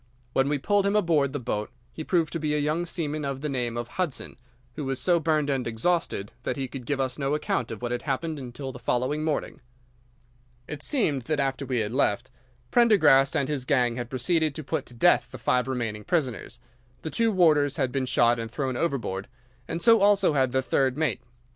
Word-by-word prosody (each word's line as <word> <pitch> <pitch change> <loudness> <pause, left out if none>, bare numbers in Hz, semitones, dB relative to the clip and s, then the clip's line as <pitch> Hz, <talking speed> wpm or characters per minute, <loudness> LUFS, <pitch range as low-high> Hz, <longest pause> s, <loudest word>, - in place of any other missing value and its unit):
When 135 +1 +2
we 145 - +1
pulled 200 +7 +1
him 200 - +1
aboard 165 -9 +2
the 145 - -3
boat 105 -4 -3 0.2
he 160 - -6
proved 165 -1 0
to 165 - -2
be 150 -1 0
a - - +1
young 155 +4 0
seaman 155 -3 -3
of 140 -1 -3
the 150 - -2
name 120 -3 -2
of 120 0 -3
Hudson, 170 +1 -4 0.4
who 150 - -5
was 135 -1 -2
so 170 +6 +3
burned 155 -2 +1
and 135 -4 -1
exhausted 115 - -1
that - - -3
he 135 -1 -2
could 125 -1 -9
give 140 -2 -1
us 130 0 -2
no 140 +1 0
account 125 -5 -1
of 115 +1 -7
what 120 - -2
had 120 0 -2
happened 155 +3 -2
until 130 +1 -6
the 125 - -10
following 130 +6 -1
morning. 155 -2 -2 1.1
"'It 150 -1 -6
seemed 155 - +1
that 155 +1 -1
after 135 0 -1
we 125 -3 0
had 105 0 -3
left, 130 -1 0 0.4
Prendergast 155 - +5
and 140 - +1
his 145 -3 -2
gang 125 -3 +2
had 120 -1 -5
proceeded 150 +4 0
to 155 - -5
put 150 0 -3
to 120 - -8
death 115 - +3
the - - -7
five 125 0 +1
remaining 115 -5 -3
prisoners. 140 - -2 0.5
The 160 - -4
two 230 -1 +2
warders 155 -7 +3
had 130 - 0
been 135 -1 -1
shot 120 -1 +3
and 115 0 -4
thrown 130 +1 -3
overboard, 120 - -2 0.4
and 170 0 -4
so 230 -2 +6
also 200 -5 +4
had 130 -3 +2
the 130 +1 +1
third 130 0 +1
mate. 155 0 0
140 Hz, 215 wpm, -26 LUFS, 125-155 Hz, 1.1 s, so